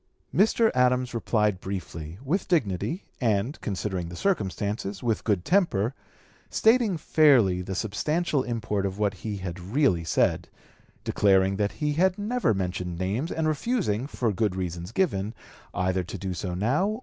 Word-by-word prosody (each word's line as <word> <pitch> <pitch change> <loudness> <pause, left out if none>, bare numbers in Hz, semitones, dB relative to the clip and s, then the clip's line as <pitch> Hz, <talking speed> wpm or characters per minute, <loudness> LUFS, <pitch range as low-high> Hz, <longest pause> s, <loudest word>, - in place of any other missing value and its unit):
Mr. 220 +2 +4
Adams 125 0 +2
replied 105 -4 +1
briefly, 85 -4 -6
with 180 +8 0
dignity, 155 - 0 0.2
and, 115 +3 0
considering 95 -3 -3
the 85 - -8
circumstances, 100 - -2
with 115 -3 0
good 100 -5 0
temper, 140 - +2 0.6
stating 225 -5 +3
fairly 130 - +4
the 95 +1 -5
substantial 150 - 0
import 110 -5 -2
of 95 0 -2
what 105 -1 +1
he 105 +2 -5
had 95 -1 -5
really 95 - +1
said, 80 - +1 0.6
declaring 95 -1 +3
that 105 0 0
he 150 -1 -1
had 180 +4 +2
never 225 - 0
mentioned 90 -3 -2
names, 100 - -2
and 160 -1 0
refusing, 155 - 0
for 120 -6 -1
good 100 -1 0
reasons 90 0 -4
given, 115 - 0 0.4
either 90 0 0
to 85 - -7
do 95 -2 -4
so 90 0 -4
now 140 - +1
(p. - - -8
105 Hz, 150 wpm, -26 LUFS, 95-150 Hz, 0.6 s, Mr